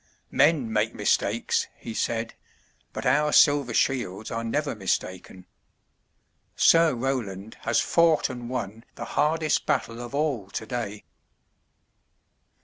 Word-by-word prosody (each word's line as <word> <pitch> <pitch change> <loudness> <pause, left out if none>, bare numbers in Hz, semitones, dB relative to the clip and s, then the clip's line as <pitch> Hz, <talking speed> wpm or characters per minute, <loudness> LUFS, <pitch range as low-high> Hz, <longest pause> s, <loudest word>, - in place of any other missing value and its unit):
"Men 140 -6 +2
make 110 +1 0
mistakes," - - 0
he 115 - -8
said, 115 0 -2 0.6
"but - - -6
our 150 +4 +3
silver 145 -5 +4
shields 110 -6 -1
are 115 0 -3
never 145 +6 -1
mistaken. 95 -2 -4 1.1
Sir 165 -4 +5
Roland 110 -5 -3
has 115 - +2
fought 165 -2 +3
and 120 -2 -7
won 115 -3 -5
the - - -6
hardest 155 0 +1
battle 120 -5 -1
of 120 +3 -7
all 140 -10 -1
today." 110 -1 -5
120 Hz, 115 wpm, -25 LUFS, 110-145 Hz, 1.1 s, Sir